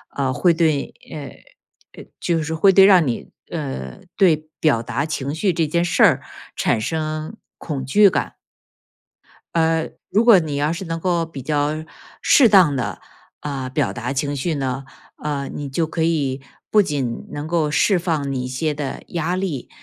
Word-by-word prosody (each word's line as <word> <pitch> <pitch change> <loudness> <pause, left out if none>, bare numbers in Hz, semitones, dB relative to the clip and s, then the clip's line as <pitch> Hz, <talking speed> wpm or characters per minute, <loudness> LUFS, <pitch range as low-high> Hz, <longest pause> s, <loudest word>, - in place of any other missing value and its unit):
呃， 135 -2 0
会 175 +6 +3
对， 160 -4 0 0.2
呃， 145 -3 -13
呃， - - -16
就 165 -2 0
是 160 +1 -3
会 195 +5 +5
对 190 0 +7
让 185 -4 +6
你 120 -4 -3 0.2
呃， 65 -1 -5 0.2
对 175 -5 +4 0.2
表 140 -8 +3
达 120 +4 -2
情 145 -2 -3
绪 190 +4 +1
这 165 -2 0
件 170 +3 +1
事 175 - +2
儿 - - +5 0.3
产 - - +1
生 155 - -3 0.2
恐 140 -4 -5
惧 200 +10 +6
感。 - - -2 1.2
呃， 160 -1 +2 0.2
如 215 +3 +3
果 225 -6 +7
你 155 -3 -3
要 145 +2 +1
是 180 +3 -5
能 165 -1 -3
够 175 -1 +1
比 160 -4 -9
较 150 +3 -1 0.4
适 260 -5 +6
当 185 -9 +5
地， 130 - -3 0.4
呃， 135 -3 -4
表 145 +2 0
达 120 +2 -4
情 140 +1 -1
绪 155 +5 -1
呢， 135 -1 -3 0.4
呃， 145 -2 -2
你 145 -1 -6
就 160 +5 -1
可 160 +1 -3
以 145 -5 0 0.3
不 210 - +5
仅 135 -9 -3
能 145 +1 -5
够 160 -2 0
释 170 +6 +3
放 155 -5 -1
你 130 -2 -2
一 - - -4
些 150 +4 -2
的 145 -2 -5
压 170 +1 -2
力， 180 -9 -3
155 Hz, 190 characters per minute, -21 LUFS, 140-170 Hz, 1.2 s, 对